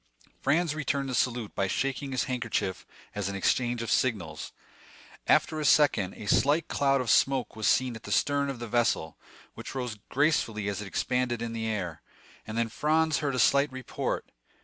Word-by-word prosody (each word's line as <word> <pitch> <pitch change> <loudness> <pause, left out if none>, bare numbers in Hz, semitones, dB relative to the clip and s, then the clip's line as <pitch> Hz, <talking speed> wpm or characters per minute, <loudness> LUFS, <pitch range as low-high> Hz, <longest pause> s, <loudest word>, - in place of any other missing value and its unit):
Franz 155 +3 +2
returned 140 -2 -1
the - - -3
salute 120 -3 0
by 100 - 0
shaking 135 +5 -2
his 130 - 0
handkerchief 115 -7 -2 0.3
as 100 -2 -2
an 100 - -4
exchange 120 +4 +1
of 115 - -3
signals. 90 -12 -1 0.8
After 155 - +3
a - - -2
second, 115 -12 +3
a - - -9
slight 145 +10 +3
cloud 135 -1 +2
of 125 - -3
smoke 135 -4 +2
was 110 -1 -1
seen 130 -2 +2
at 110 - -9
the - - -8
stern 140 -1 +2
of 135 - -4
the 120 0 -6
vessel, 115 -9 0 0.3
which - - -8
rose 125 -5 -4
gracefully 125 -8 +1
as 100 0 -2
it 105 - -6
expanded 125 +3 -1
in 115 0 -4
the 110 -1 -3
air, 95 -7 -3 0.5
and 110 - -5
then 115 0 +1
Franz 155 +6 +1
heard 140 -4 -1
a - - -2
slight 140 +3 +4
report. 130 -1 -4
125 Hz, 185 wpm, -28 LUFS, 110-140 Hz, 0.8 s, slight